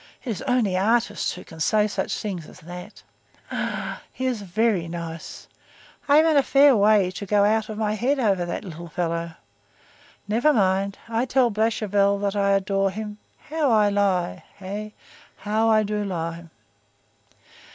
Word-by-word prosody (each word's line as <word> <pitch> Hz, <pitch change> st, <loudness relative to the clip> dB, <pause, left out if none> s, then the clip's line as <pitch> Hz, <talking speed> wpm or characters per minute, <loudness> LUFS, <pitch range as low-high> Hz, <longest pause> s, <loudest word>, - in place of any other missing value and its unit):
'_ -, -, -23 dB, 0.2 s
It 250 Hz, -, -3 dB
is 195 Hz, -, -4 dB
only 240 Hz, -7 st, +2 dB
artists 210 Hz, +2 st, +1 dB
who -, -, -9 dB
can 160 Hz, -, -13 dB
say 210 Hz, +6 st, +3 dB
such 210 Hz, -, -2 dB
things 185 Hz, -7 st, -5 dB
as -, -, -15 dB
that. 180 Hz, +5 st, -10 dB, 0.5 s
Ah! -, -, -3 dB
he 260 Hz, -, -5 dB
is 250 Hz, -5 st, -1 dB
very 200 Hz, -2 st, 0 dB
nice. 165 Hz, -1 st, -7 dB, 0.6 s
I 285 Hz, 0 st, +6 dB
am 315 Hz, -, +6 dB
in 315 Hz, -2 st, +4 dB
a -, -, +7 dB
fair 275 Hz, 0 st, +5 dB
way 205 Hz, -3 st, +4 dB
to 200 Hz, -, -6 dB
go 205 Hz, +1 st, +3 dB
out 215 Hz, +1 st, +1 dB
of 215 Hz, -, -5 dB
my 215 Hz, -1 st, 0 dB
head 250 Hz, +7 st, 0 dB
over 200 Hz, -7 st, +2 dB
that 175 Hz, +4 st, -4 dB
little 170 Hz, -1 st, -8 dB
fellow. 170 Hz, 0 st, -3 dB, 0.9 s
Never 240 Hz, +9 st, +3 dB
mind; 195 Hz, -2 st, +1 dB
I 230 Hz, +2 st, 0 dB
tell 255 Hz, -2 st, +2 dB
Blachevelle 205 Hz, -2 st, +1 dB
that 200 Hz, 0 st, -1 dB
I 200 Hz, -1 st, +2 dB
adore 195 Hz, 0 st, +1 dB
him—how 220 Hz, -, -4 dB
I 210 Hz, -2 st, +4 dB
lie! 195 Hz, -3 st, 0 dB
Hey! 205 Hz, +2 st, -7 dB, 0.4 s
How 220 Hz, +2 st, 0 dB
I 215 Hz, -1 st, +4 dB
do 210 Hz, 0 st, -2 dB
lie!" 170 Hz, -3 st, -4 dB
205 Hz, 165 wpm, -24 LUFS, 185-225 Hz, 0.9 s, a